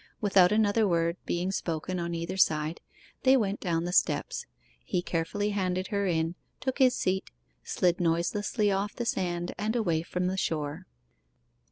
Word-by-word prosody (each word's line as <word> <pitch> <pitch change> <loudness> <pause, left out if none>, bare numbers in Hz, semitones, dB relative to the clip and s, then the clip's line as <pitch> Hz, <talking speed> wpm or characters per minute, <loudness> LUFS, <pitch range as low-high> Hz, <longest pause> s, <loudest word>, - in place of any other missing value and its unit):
Without 195 -3 +5
another 215 0 +3
word 170 -1 +1
being 180 +2 0
spoken 175 0 -2
on 170 0 -2
either 170 +2 -3
side, 155 -3 +2 0.4
they 265 +1 +5
went 205 -4 0
down 170 -3 -1
the 175 +1 -3
steps. - - +1 0.4
He 175 - -1
carefully 195 +6 -1
handed 185 -2 -1
her 200 -2 0
in, 165 -1 0 0.3
took 260 +1 -3
his 255 -2 +5
seat, 190 +1 -1 0.3
slid 175 -1 +1
noiselessly 180 +5 +1
off 200 +2 -1
the 240 - -3
sand, 175 -4 -1
and 215 +2 -1
away 170 -9 +1
from 180 +2 -3
the 185 +1 -1
shore. 150 -5 -2
185 Hz, 160 wpm, -29 LUFS, 170-205 Hz, 0.4 s, Without